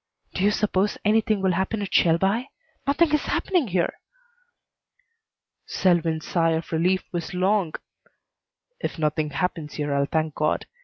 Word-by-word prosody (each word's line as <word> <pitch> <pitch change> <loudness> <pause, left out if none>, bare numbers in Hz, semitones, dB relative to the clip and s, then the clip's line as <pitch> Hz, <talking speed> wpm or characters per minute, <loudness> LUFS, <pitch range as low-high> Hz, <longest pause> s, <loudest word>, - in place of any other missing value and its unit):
"Do 185 - -1
you 205 - +5
suppose 205 -1 0
anything 215 -1 +2
will 190 - +3
happen 190 +4 -1
at 190 - -6
Shelby? 195 +9 +3 0.4
Nothing 305 +2 +3
is 300 - +2
happening 355 -9 +1
here." 180 -3 -1 1.7
Selwyn's 165 -3 +1
sigh 165 -2 +2
of 160 0 -3
relief 180 +3 +1
was 175 0 -4
long. 185 -2 +1 1.0
"If - - -4
nothing 155 -1 0
happens 155 0 -3
here 145 -1 -2
I'll 140 0 +1
thank 155 -1 -1
God. 155 +1 0
180 Hz, 140 wpm, -24 LUFS, 160-205 Hz, 1.7 s, you